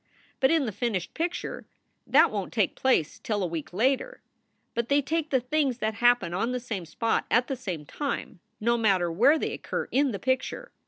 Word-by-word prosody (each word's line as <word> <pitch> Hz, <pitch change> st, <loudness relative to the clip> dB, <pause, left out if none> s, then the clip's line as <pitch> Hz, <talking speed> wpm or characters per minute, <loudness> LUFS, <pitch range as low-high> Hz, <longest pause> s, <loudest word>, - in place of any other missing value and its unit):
But 265 Hz, -, +4 dB
in 325 Hz, -4 st, +3 dB
the 220 Hz, -, -2 dB
finished 205 Hz, -4 st, -2 dB
picture 345 Hz, +2 st, -3 dB, 0.4 s
that -, -, +5 dB
won -, -, -3 dB
t -, -, -16 dB
take -, -, +2 dB
place 255 Hz, -, +1 dB
till 210 Hz, -3 st, -2 dB
a -, -, +1 dB
week 165 Hz, -3 st, -5 dB
later. 265 Hz, -, 0 dB, 0.5 s
But 235 Hz, 0 st, -2 dB
they 285 Hz, +1 st, +4 dB
take 315 Hz, +2 st, -1 dB
the 260 Hz, -, +3 dB
things 265 Hz, 0 st, 0 dB
that 220 Hz, -3 st, -1 dB
happen 240 Hz, -6 st, +3 dB
on 230 Hz, +7 st, -1 dB
the 250 Hz, -, -1 dB
same 210 Hz, -8 st, -5 dB
spot 225 Hz, +8 st, -1 dB
at 235 Hz, +2 st, +3 dB
the 270 Hz, -, -3 dB
same 180 Hz, -11 st, -5 dB
time, 280 Hz, -, -4 dB, 0.2 s
no 235 Hz, +2 st, +1 dB
matter 190 Hz, -6 st, +2 dB
where 250 Hz, -, +5 dB
they -, -, -2 dB
occur -, -, -4 dB
in 275 Hz, 0 st, +2 dB
the 200 Hz, -, -3 dB
picture. 260 Hz, -, -2 dB
240 Hz, 205 wpm, -27 LUFS, 200-275 Hz, 0.5 s, that